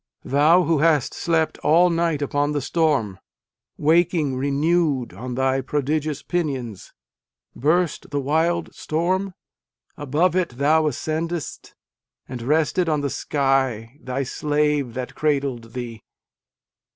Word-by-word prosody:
Thou 155 Hz, +6 st, +4 dB
who 165 Hz, -3 st, +1 dB
hast 150 Hz, -4 st, +2 dB
slept 165 Hz, -2 st, 0 dB
all 170 Hz, +4 st, +4 dB
night 165 Hz, -3 st, 0 dB
upon 145 Hz, +1 st, 0 dB
the 145 Hz, -, -1 dB
storm, 135 Hz, -, 0 dB, 0.6 s
Waking 160 Hz, -2 st, +2 dB
renewed 140 Hz, -, 0 dB
on 125 Hz, +6 st, -6 dB
thy 135 Hz, +1 st, +1 dB
prodigious 150 Hz, +1 st, -2 dB
pinions, 135 Hz, -, -3 dB, 0.6 s
(Burst 165 Hz, +5 st, 0 dB
the 145 Hz, -, -1 dB
wild 160 Hz, +5 st, 0 dB
storm? 185 Hz, +4 st, -1 dB, 0.6 s
above 150 Hz, +6 st, +1 dB
it 170 Hz, -10 st, -1 dB
thou 155 Hz, +3 st, +3 dB
ascended 160 Hz, +4 st, -2 dB
st, -, -, -10 dB, 0.5 s
And 125 Hz, -2 st, -6 dB
rested 160 Hz, +6 st, +1 dB
on 150 Hz, -2 st, +1 dB
the 140 Hz, -1 st, -2 dB
sky, 135 Hz, -3 st, -1 dB
thy 130 Hz, +2 st, -3 dB
slave 145 Hz, -2 st, 0 dB
that. 125 Hz, -1 st, -5 dB
cradled 135 Hz, -6 st, -1 dB
thee 120 Hz, -3 st, -6 dB
145 Hz, 120 wpm, -22 LUFS, 135-165 Hz, 0.6 s, Thou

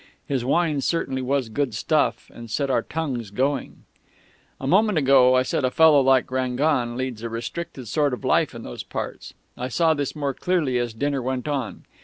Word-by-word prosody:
His 135 Hz, -4 st, -1 dB
wine 150 Hz, +2 st, +1 dB
certainly 135 Hz, -4 st, -1 dB
was 130 Hz, -1 st, 0 dB
good 125 Hz, 0 st, -2 dB
stuff, 150 Hz, +8 st, 0 dB
and 120 Hz, -1 st, -10 dB
set 135 Hz, +4 st, -1 dB
our 120 Hz, -, +2 dB
tongues 130 Hz, -7 st, -4 dB
going.... 135 Hz, +6 st, -2 dB, 0.8 s
"A -, -, -6 dB
moment 200 Hz, +5 st, +3 dB
ago 130 Hz, -3 st, +5 dB
I 130 Hz, -, +4 dB
said 130 Hz, -, -1 dB
a 130 Hz, -, +3 dB
fellow 155 Hz, 0 st, +5 dB
like 130 Hz, -1 st, +3 dB
Rangon 130 Hz, -1 st, 0 dB
leads 130 Hz, -4 st, -4 dB
a 115 Hz, -, -4 dB
restricted 125 Hz, +3 st, -6 dB
sort 145 Hz, +6 st, +1 dB
of 125 Hz, -4 st, -5 dB
life -, -, +2 dB
in -, -, -8 dB
those -, -, -7 dB
parts. -, -, -6 dB, 0.2 s
I 125 Hz, -, -4 dB
saw 160 Hz, +6 st, +2 dB
this 145 Hz, -1 st, -3 dB
more 140 Hz, -2 st, -2 dB
clearly 150 Hz, -7 st, 0 dB
as 120 Hz, -2 st, -3 dB
dinner 140 Hz, +2 st, -1 dB
went 130 Hz, +2 st, -3 dB
on. 140 Hz, -5 st, -3 dB
135 Hz, 190 wpm, -23 LUFS, 125-145 Hz, 0.8 s, ago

